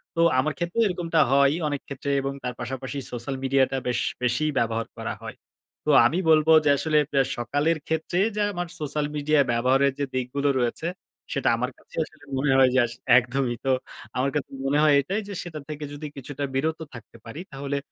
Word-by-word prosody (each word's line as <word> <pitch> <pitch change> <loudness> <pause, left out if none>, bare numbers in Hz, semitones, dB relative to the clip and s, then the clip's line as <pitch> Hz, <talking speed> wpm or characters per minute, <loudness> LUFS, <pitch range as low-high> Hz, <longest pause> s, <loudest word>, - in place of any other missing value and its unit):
তো 165 - +2 0.2
আমার 155 +3 +1
ক্ষেত্রেও 175 +7 0
এরকমটা 170 -3 0
হয়ই 140 +3 +4
অনেক 145 -2 -2
ক্ষেত্রে 140 +1 -5
এবং 135 0 -3
তার 125 0 -3
পাশাপাশি 130 +3 -5
সোশ্যাল 125 +2 -4
মিডিয়াটা 135 0 +2
বেশ, 125 - 0 0.2
বেশি 125 +5 +1
ব্যবহার 115 0 0
করা - - -3
হয়। - - -7 0.5
তো - - -1 0.2
আমি 145 +9 +2
বলব 155 -1 +5 0.2
যে, - - +4
আসলে 155 +1 +1
অ্যা 135 -1 +4 0.2
সকালের 145 +7 0
ক্ষেত্রে 160 +2 -1 0.2
যে 210 - 0
আমার 175 -2 -3
সোশ্যাল 150 0 -1
মিডিয়া 150 +1 +2
ব্যবহারের 130 +4 +3
যে 140 - +1
দিকগুলো 130 +3 -1
রয়েছে, 120 +7 -1 0.5
সেটা 140 - +1
আমার 125 +2 -2
কাছে - - -18
আসলে 150 -2 -19
মনে 135 0 +1
হয় 130 -1 +6
যে 130 - +5
আসলে 120 +1 -10
একদমই। 125 0 0
তো 135 - +3 0.5
আমার 135 +2 +2
কাছে 145 - -2 0.2
মনে 140 +2 +2
হয় 150 -2 +5
এটাই 195 +10 -2
যে, 205 - -6
সেটা 160 -3 -7
থেকে 150 0 -5
যদি 150 +1 -6
কিছুটা 140 +1 -6
বিরত 160 +4 0
থাকতে 115 -1 -12
পারি, 115 +7 -8
তাহলে 140 +1 -3
140 Hz, 190 wpm, -25 LUFS, 130-155 Hz, 0.5 s, হয়